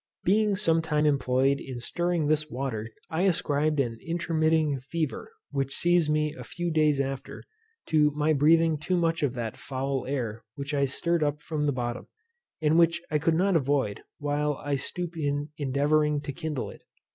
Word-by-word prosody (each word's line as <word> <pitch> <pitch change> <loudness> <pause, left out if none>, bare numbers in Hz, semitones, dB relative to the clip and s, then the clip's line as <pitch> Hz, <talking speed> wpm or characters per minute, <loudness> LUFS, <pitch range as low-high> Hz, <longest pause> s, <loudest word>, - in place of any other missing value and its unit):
Being 210 +2 +3
some 165 -5 +2
time 150 -1 +1
employed 135 -1 +2
in 130 -2 -7
stirring 175 +5 0
this 155 0 +1
water, 120 -4 -3 0.2
I 160 +2 0
ascribed 155 -5 +1
an 115 -4 -1
intermitting 160 -3 +1
fever, 155 +3 -4 0.2
which 135 -1 -1
seized 175 -3 +3
me 150 0 +1
a - - -9
few 175 -1 -3
days 155 -3 +3
after, 135 0 -4 0.4
to 150 -1 +4
my 150 +1 +2
breathing 160 +2 +4
too 180 +5 0
much 165 -1 +1
of 135 -4 0
that 115 -3 -4
foul 135 -1 -3
air 120 -5 -3
which 140 0 -5
I 140 -1 +2
stirred 170 +5 0
up 150 0 -1
from 150 -2 -2
the 145 - +2
bottom, 120 -2 -4 0.6
and 155 +2 +4
which 170 0 +4
I 150 - +2
could 160 +2 +2
not 190 +2 +2
avoid 140 -8 +1 0.2
while 145 0 0
I 145 +1 -4
stooped 170 +5 -3
in 145 -1 -1
endeavouring 145 +2 +2
to 145 -1 -5
kindle 155 -4 -4
it. - - -14
150 Hz, 175 wpm, -27 LUFS, 140-160 Hz, 0.6 s, to